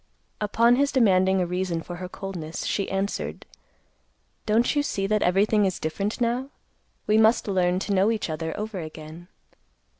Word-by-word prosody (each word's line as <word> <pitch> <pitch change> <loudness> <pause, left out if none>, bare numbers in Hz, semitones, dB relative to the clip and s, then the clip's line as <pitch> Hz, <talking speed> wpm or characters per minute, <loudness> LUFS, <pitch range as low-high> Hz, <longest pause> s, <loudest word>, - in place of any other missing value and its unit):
Upon 230 +3 +3
his 280 +1 +2
demanding 190 -6 +3
a 180 - +1
reason 180 -2 -2
for 175 +1 -7
her 180 0 -6
coldness, 175 -5 -6
she 200 - -1
answered, 195 +1 -3 1.0
"Don't 230 +6 +2
you 290 - +3
see 195 -8 -2
that 215 +1 +1
everything 205 +4 +3
is 190 -2 0
different 200 +9 -3
now? 245 +3 -1 0.6
We 215 +1 +3
must 220 +1 +4
learn 180 -2 +1
to 200 +2 -2
know 195 +2 +3
each 225 -2 -1
other 160 +1 -4
over 210 -2 -4
again." 155 +1 -9
195 Hz, 160 wpm, -25 LUFS, 180-220 Hz, 1.0 s, must